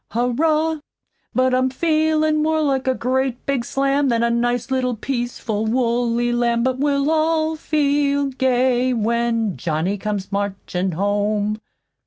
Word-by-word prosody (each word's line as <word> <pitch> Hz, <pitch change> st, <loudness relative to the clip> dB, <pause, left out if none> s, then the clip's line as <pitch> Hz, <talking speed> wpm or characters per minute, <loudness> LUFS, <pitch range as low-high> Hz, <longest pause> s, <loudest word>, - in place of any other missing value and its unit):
Hurrah! 305 Hz, +7 st, +1 dB, 0.6 s
But 255 Hz, 0 st, +2 dB
I'm 255 Hz, +1 st, +2 dB
feelin' 310 Hz, +1 st, +1 dB
more 315 Hz, +1 st, +1 dB
like 270 Hz, -3 st, 0 dB
a 260 Hz, -, +2 dB
great 255 Hz, 0 st, -1 dB
big 275 Hz, -4 st, 0 dB
slam 275 Hz, +2 st, +1 dB
Than 235 Hz, -1 st, +1 dB
a 235 Hz, -, +2 dB
nice 240 Hz, +2 st, -1 dB
little 255 Hz, -2 st, 0 dB
peaceful 235 Hz, -3 st, -3 dB
woolly 240 Hz, 0 st, +1 dB
lamb, 235 Hz, -1 st, +1 dB
But 260 Hz, 0 st, 0 dB
we'll 285 Hz, +1 st, +1 dB
all 320 Hz, 0 st, +1 dB
feel 285 Hz, -2 st, +1 dB
gay 255 Hz, -1 st, +1 dB
when 230 Hz, -3 st, 0 dB
Johnny 165 Hz, +8 st, -2 dB
comes 205 Hz, -2 st, -4 dB
marchin' 195 Hz, -2 st, -2 dB
home." 205 Hz, +3 st, 0 dB
250 Hz, 135 wpm, -21 LUFS, 230-280 Hz, 0.6 s, But